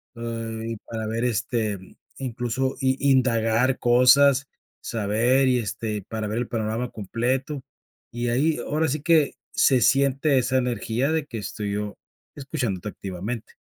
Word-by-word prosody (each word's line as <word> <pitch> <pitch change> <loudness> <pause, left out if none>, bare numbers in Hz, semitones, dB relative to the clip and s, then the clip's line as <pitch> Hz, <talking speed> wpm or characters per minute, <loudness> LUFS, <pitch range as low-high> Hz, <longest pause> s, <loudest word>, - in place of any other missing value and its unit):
eh, 115 -1 -5
y 115 - -4
para 110 +1 -6
ver, 115 +2 -2
este, 110 -3 -1 0.4
incluso, 130 +1 -2
i 135 +1 +2
indagar 125 0 +2
cosas, 130 +3 +5 0.3
saber 115 +5 +1
y 125 -1 +3
este 105 -1 -3
para 110 -1 -3
ver 110 +3 -2
el 120 - -2
panorama 115 +1 -2
completo. 130 +7 -2 0.5
Y 120 0 -2
ahí 150 +6 +2
ahora 155 +2 0
sí 145 +2 -2
que 160 -4 +3 0.2
se 130 -2 +4
siente 140 +1 +3
esa 130 +1 +1
energía 125 +2 0
de 160 -2 0
que 115 - -6
estoy 105 -1 -4
yo 105 0 -4 0.4
escuchándote 125 - -3
activamente. 100 +4 -6
120 Hz, 140 wpm, -24 LUFS, 110-135 Hz, 0.5 s, cosas